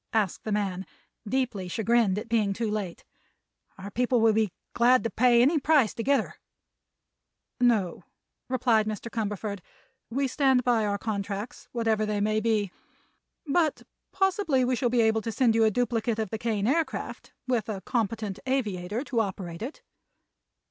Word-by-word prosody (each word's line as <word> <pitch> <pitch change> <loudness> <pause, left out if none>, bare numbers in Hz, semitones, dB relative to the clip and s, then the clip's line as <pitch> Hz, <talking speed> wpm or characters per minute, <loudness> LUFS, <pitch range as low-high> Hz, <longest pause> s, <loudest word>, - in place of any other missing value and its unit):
asked 210 -5 0
the 215 - -2
man, 195 -3 -1 0.5
deeply 240 -7 -1
chagrined 220 0 +2
at 210 - -4
being 220 -4 +1
too 225 +1 -2
late. 200 -5 -4 0.7
"Our 195 +1 -8
people 245 +2 +1
will 225 -1 +4
be 220 -1 +2 0.2
glad 250 +2 +4
to 230 - -2
pay 240 0 +4
any 300 +4 +3
price 290 -5 +3
to 230 - -4
get 275 +4 +3
her." - - -6 1.2
"No," 225 -8 +1 0.4
replied 235 -4 +2
Mr. 215 +2 -5
Cumberford; 205 -2 -3 0.5
"we 270 +4 0
stand 265 -1 +2
by 230 -3 +2
our 200 0 0
contracts, 205 +1 -4
whatever 225 -2 +1
they 210 -1 -1
may 215 +1 +1
be. 215 -3 0 0.7
But 310 +1 +1 0.3
possibly 380 -9 +1
we 255 0 +1
shall 245 0 0
be 240 0 +3
able 220 0 +2
to 225 - -3
send 235 0 +3
you 225 0 +4
a - - +5
duplicate 230 0 0
of 220 -3 -3
the 220 - -3
Kane 215 -3 -1
Aircraft, 310 +7 -2 0.2
with 235 -4 0
a 200 -3 -4
competent 220 -2 -2
aviator 215 -4 -1
to 250 -5 -1
operate 185 -5 -3
it." 285 - -6
225 Hz, 160 wpm, -27 LUFS, 210-250 Hz, 1.2 s, a